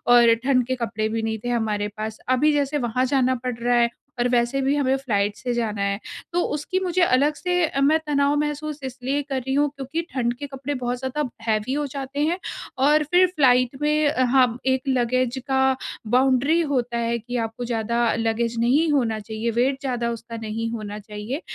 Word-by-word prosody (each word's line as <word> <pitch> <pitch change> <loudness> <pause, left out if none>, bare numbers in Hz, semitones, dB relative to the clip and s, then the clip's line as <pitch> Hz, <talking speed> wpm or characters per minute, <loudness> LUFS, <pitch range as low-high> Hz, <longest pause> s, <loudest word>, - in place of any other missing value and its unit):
और 235 -1 +7
ठंड 255 -3 +3
के 260 - 0
कपड़े 220 -3 -2
भी 225 0 -2
नहीं 220 0 -2
थे - - -1
हमारे 215 -3 0
पास। 215 0 -5
अभी 295 +4 +3
जैसे 285 0 0
वहाँ 250 +3 +1
जाना 260 -1 +2
पड़ 250 -1 -2
रहा 245 +1 +1
है 235 0 +3 0.3
और 240 - +3
वैसे 240 +2 +1
भी 270 +2 +2
हमें 270 -2 +2
फ्लाइट 205 -6 0
से 245 +2 -3
जाना 215 -4 -2
है। 200 +1 0 0.3
तो 350 - +2
उसकी 370 +6 -2
मुझे 370 -1 0
अलग 290 -2 +3
से 360 +2 0
अ, 275 -2 -2
मैं 310 +3 +4
तनाव 285 0 +2
महसूस 300 0 -3
इसलिए 265 +2 -2
कर 270 - -1
रही 265 +2 -3
हूँ, 290 +1 +3
क्योंकि 275 +4 -3
ठंड 240 -2 0
के 285 - -6
कपड़े 275 +1 -5
बहुत 245 0 -1
ज़्यादा 265 +3 -2 0.2
हेवी 220 +3 0
हो 295 +1 -1
जाते 275 +1 -6
हैं 340 +3 0 0.5
और 300 +1 +4
फिर 355 +5 +4
फ्लाइट 255 -2 +4
में 300 0 +2
अ, 285 -3 +1
हाँ, 250 -2 +3
एक 260 -1 +2
लगेज 255 0 +1
का 265 -1 +2 0.5
बाउंड्री 265 +5 +3
होता 240 -2 0
है 235 0 0
कि 245 +2 -5
आपको 225 +2 -6
ज़्यादा 235 0 0
लगेज 230 +1 -1
नहीं 285 +7 +3
होना 235 -6 +1
चाहिए, 220 +2 -3
वेट 255 +4 +1
ज़्यादा 245 -3 -1
उसका 230 0 -7
नहीं 225 +1 -3
होना 210 -2 -5
चाहिए। 210 - -6
255 Hz, 200 wpm, -23 LUFS, 230-280 Hz, 0.5 s, और